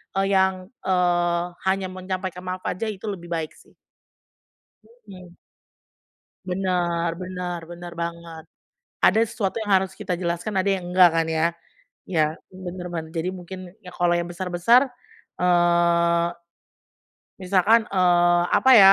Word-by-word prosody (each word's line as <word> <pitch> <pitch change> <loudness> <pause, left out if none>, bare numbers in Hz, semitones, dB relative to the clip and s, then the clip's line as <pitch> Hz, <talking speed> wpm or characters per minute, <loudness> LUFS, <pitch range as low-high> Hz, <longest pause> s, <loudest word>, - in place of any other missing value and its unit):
e - - +1
yang, 190 -1 +2
eee, 175 -2 +1 0.2
hanya 190 0 +1
menyampaikan 185 -1 -5
maaf 185 0 -4
aja 205 +5 -2
itu 200 -1 -8
lebih 190 -5 -5
baik 165 -2 -3
sih. - - -22 1.3
Mhm. 180 -3 -12 1.1
Benar 175 -2 0
benar 180 -1 -4
benar 175 0 -8
banget. 170 -1 -6 0.6
Ada 220 - +5
sesuatu 215 -3 -3
yang 210 -2 -4
harus 190 0 -4
kita 190 -4 -4
jelaskan, 175 +4 -3
ada 195 +1 +2
yang 180 - -7
enggak 180 -1 +6
kan 165 -1 +1
ya? 160 0 +1 0.6
Ya, 155 -3 0 0.2
benar 185 -1 -7
ben 165 -2 -3
jadi 170 +3 -1
mungkin, 185 0 -9
ya 185 - -13
kalau 175 0 +2
yang 175 0 -1
besar-besar, 185 +9 +2 0.5
eee, 170 -1 +3 1.2
misalkan, 200 +5 +4
eee, 175 -2 +4
apa 265 - +4
ya, 195 -1 +10
180 Hz, 130 wpm, -23 LUFS, 175-190 Hz, 1.3 s, ya